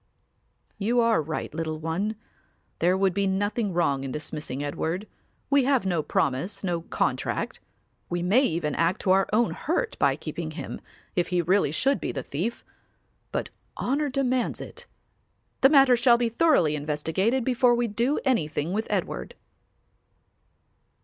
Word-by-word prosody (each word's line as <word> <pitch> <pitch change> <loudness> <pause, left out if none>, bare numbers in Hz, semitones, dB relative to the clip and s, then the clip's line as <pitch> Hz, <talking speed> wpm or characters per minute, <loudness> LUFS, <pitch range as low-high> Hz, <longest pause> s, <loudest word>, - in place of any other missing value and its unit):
"You 230 +4 +1
are 230 -6 +3
right, 155 0 -4
little 160 -1 -3
one; 165 +7 -2 0.6
there 180 +2 +3
would 190 -1 +2
be 200 +1 +1
nothing 205 +2 0
wrong 155 -6 +1
in 135 - -4
dismissing 150 -1 -5
Edward; 165 +7 -3 0.4
we 280 -2 +4
have 265 -5 +2
no 175 -4 +1
promise, 150 +9 -1
no 175 -3 -1
contract: - - -2 0.5
we 175 0 -2
may 205 +9 +4
even 165 - 0
act 170 +2 +1
to 185 - +2
our 190 0 +3
own 225 +2 +2
hurt 400 - -2
by - - +3
keeping - - -5
him, - - -6 0.3
if 175 -1 +1
he 180 - 0
really 180 -2 +2
should 270 - +1
be - - -2
the - - -4
thief, 185 +12 -4 0.7
but - - -3 0.3
honour 285 +3 0
demands 260 -2 0
it. - - -10 0.7
The 270 - +7
matter 270 -4 +6
shall 240 0 +5
be 235 -1 0
thoroughly 230 - +3
investigated 160 - 0
before 250 -1 +3
we 240 0 0
do 235 +7 0
anything 165 - 0
with 220 +2 -1
Edward." - - -3
195 Hz, 150 wpm, -26 LUFS, 165-240 Hz, 0.7 s, The